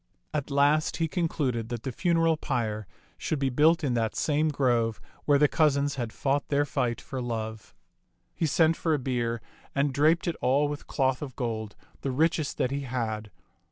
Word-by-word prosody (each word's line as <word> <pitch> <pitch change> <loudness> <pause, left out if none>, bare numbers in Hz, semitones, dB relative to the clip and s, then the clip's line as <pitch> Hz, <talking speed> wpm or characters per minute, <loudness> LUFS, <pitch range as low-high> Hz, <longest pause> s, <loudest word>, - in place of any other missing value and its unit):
At 145 -2 -2
last 145 +2 +3
he 165 - +1
concluded 140 -8 -1
that 120 -2 -4
the 130 - -3
funeral 165 +3 +2
pyre 110 -8 -2 0.3
should 155 - -1
be 135 -1 0
built 160 +6 +4
in 135 -4 +1
that 115 -2 0
same 155 +1 +1
grove 120 -6 +1 0.3
where 145 -1 +5
the 150 +1 +5
cousins 145 -2 +2
had 120 -4 -3
fought 140 +4 0
their 145 0 +2
fight 120 -4 -1
for 130 -2 -6
love. 110 -3 -5 0.6
He 165 - 0
sent 160 +2 +3
for 160 -2 +1
a - - 0
bier 120 -4 -2 0.3
and 140 0 +1
draped 155 +6 +3
it 170 - 0
all 140 +4 +3
with 145 0 -6
cloth 130 -2 +1
of 135 -4 -6
gold, 110 -4 -3 0.3
the 140 - -2
richest 155 +2 +1
that 125 - 0
he 140 - -1
had. 115 -5 -3
140 Hz, 185 wpm, -28 LUFS, 120-150 Hz, 0.6 s, where